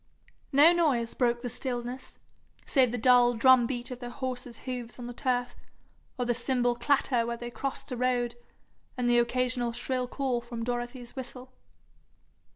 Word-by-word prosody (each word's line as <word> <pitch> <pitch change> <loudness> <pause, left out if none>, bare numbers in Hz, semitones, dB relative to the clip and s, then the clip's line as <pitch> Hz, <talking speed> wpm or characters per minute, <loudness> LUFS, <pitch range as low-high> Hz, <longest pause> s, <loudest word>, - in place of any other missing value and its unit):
No 300 +5 +7
noise 275 -9 +1
broke 240 -2 +1
the 245 - -4
stillness, 245 +1 -4 0.5
save 260 -4 +3
the 245 - -2
dull 245 0 +5
drum 250 0 +6
beat 245 -1 -4
of 250 - -6
their 245 -1 -6
horses' 250 -2 -5
hoofs 245 -2 -5
on 245 - -7
the 245 - -6
turf, 245 -1 -1 0.6
or 250 - -1
their 240 - +1
cymbal 245 0 +2
clatter 250 -1 +2
where 235 0 -3
they 240 0 -7
crossed 275 +2 -5
a - - -2
road, 245 -1 0 0.6
and 250 -1 0
the 240 0 +5
occasional 245 0 0
shrill 250 +1 -2
call 255 -2 -1
from 235 -1 -6
Dorothy's 240 +1 -4
whistle. 255 -1 -8
245 Hz, 165 wpm, -29 LUFS, 240-255 Hz, 0.6 s, No